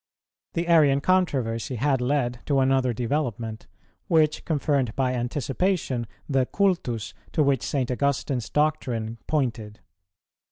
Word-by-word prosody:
The 170 +1 -1
Arian 150 -5 +5
controversy 140 -9 0
had 135 +2 +1
led 125 -2 0
to 140 -2 +2
another 130 -1 +2
development, 115 -3 -3 0.4
which 155 -2 +2
confirmed 140 -6 0
by 130 -1 +1
anticipation 130 - -1 0.2
the 135 -3 +1
cultus 130 - 0 0.2
to 155 - +3
which 140 -4 +2
St. 130 -3 -1
Augustine's 135 -1 -1
doctrine 120 -7 -1
pointed. 115 -8 -2
135 Hz, 115 wpm, -25 LUFS, 120-150 Hz, 0.4 s, Arian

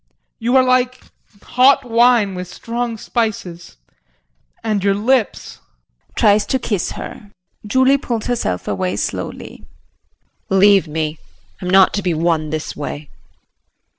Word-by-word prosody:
] - - -53
You 245 +2 +2
are 260 - +6
like 255 0 +1 0.4
hot 265 +2 +3
wine 230 -3 +3
with 180 -1 -7
strong 235 0 -4
spices, 215 - -4 0.9
and 210 -3 -1
your 200 -1 +2
lips 230 +1 -1 0.6
[Tries 205 0 +4
to 265 - +1
kiss 210 -7 -2
her. 205 - -9 0.4
Julie 260 +4 +3
pulls 235 -5 -3
herself 225 - -2
away 95 -1 -2
slowly.] - - -5 0.9
JULIE. 195 - +2
Leave 200 -2 +5
me 155 0 -3 0.4
I'm 180 - -4
not 190 0 +5
to 205 - -1
be 180 -3 -1
won 160 -1 0
this 155 0 -4
way. 145 0 -7
205 Hz, 135 wpm, -18 LUFS, 170-245 Hz, 0.9 s, are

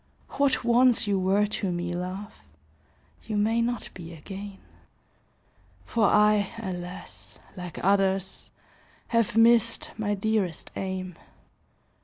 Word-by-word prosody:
What 280 -2 +1
once 240 0 +4
you 200 -2 +1
were 195 +3 +3
to 200 -2 -2
me, 175 0 -3
love, 185 +3 -5 0.9
You 215 -2 -2
may 225 +3 +2
not 240 0 -2
be 170 -2 -9
again. 195 +5 -8 1.3
For 230 -3 +1
I, 210 -1 +4
alas! 180 -4 -7 0.2
like 180 -2 -7
others, 195 -1 +1 0.6
Have 230 -2 +1
missed 230 +6 +4
my 205 -1 0
dearest 200 -5 -1
aim. 185 -2 -4
205 Hz, 110 wpm, -27 LUFS, 185-225 Hz, 1.3 s, once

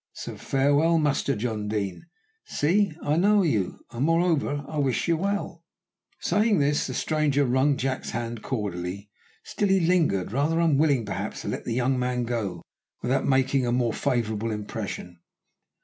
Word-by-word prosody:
So - - -7
farewell, 145 +5 +2
Master 145 -3 +1
John 110 -1 -3
Deane: 100 -4 -2
you - - -14 0.4
see 185 +4 +1
I 150 +2 +1
know 205 +3 +4
you, 110 - -1
and 120 +3 -2
moreover 160 -3 +1
I 155 - -3
wish 135 -4 0
you 170 - +3
well." 190 -2 -3 0.6
Saying 210 +3 +2
this, 145 0 +1
the 130 - -5
stranger 150 -3 +1
wrung 130 +3 +2
Jack's 130 0 -2
hand 115 -1 -4
cordially. 100 -4 -4 0.3
Still 205 - -1
he 195 0 +4
lingered, 165 - +2
rather 145 +6 +1
unwilling 145 -6 +3
perhaps 100 - -4
to - - -4
let - - -4
the 115 - -2
young 130 +1 +1
man 125 0 -1
go 115 -6 -3 0.4
without 130 +2 +1
making 130 -1 +2
a - - +1
more 120 -2 +1
favourable 115 -5 -1
impression. 105 -4 -5
135 Hz, 160 wpm, -26 LUFS, 115-155 Hz, 0.6 s, know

